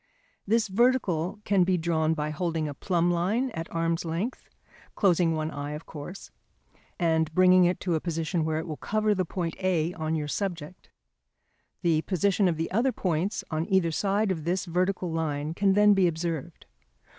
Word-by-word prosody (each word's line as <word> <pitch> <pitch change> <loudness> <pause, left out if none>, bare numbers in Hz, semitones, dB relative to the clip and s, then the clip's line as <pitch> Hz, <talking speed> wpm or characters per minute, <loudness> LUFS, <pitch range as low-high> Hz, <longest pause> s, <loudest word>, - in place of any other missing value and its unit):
This 225 +2 +2
vertical 205 -5 +1
can 200 -3 +3
be 180 0 +2
drawn 160 -1 +1
by 150 0 -2
holding 160 -1 -2
a 145 - -4
plumb 175 +3 0
line 210 +10 0
at 165 -5 -6
arm's 165 0 -1
length 170 +9 -4 0.5
(closing 175 -4 +3
one 155 0 -2
eye, 145 0 -5
of 150 +2 -7
course) 160 +6 -9 0.7
and 160 -2 +1
bringing 185 0 +6
it 180 +1 +1
to 180 - -1
a 160 - +1
position 165 0 -1
where 155 0 -1
it 160 - -3
will 155 -2 -5
cover 215 0 0
the 185 -2 -1
point 170 -1 -3
A 180 -3 0
on 160 -1 -2
your 150 -2 -2
subject. 175 -1 -5 0.9
The 160 -2 +3
position 195 +2 +1
of 170 -3 0
the 165 - -3
other 235 +7 +2
points 185 -1 -1
on 160 +1 -1
either 185 -3 +3
side 200 +4 +1
of 160 -4 -3
this 180 +4 -1
vertical 180 0 -1
line 155 -2 -2
can 195 +2 +2
then 210 +1 +6
be 190 -2 +4
observed. 165 -1 -4
170 Hz, 180 wpm, -27 LUFS, 160-190 Hz, 0.9 s, bringing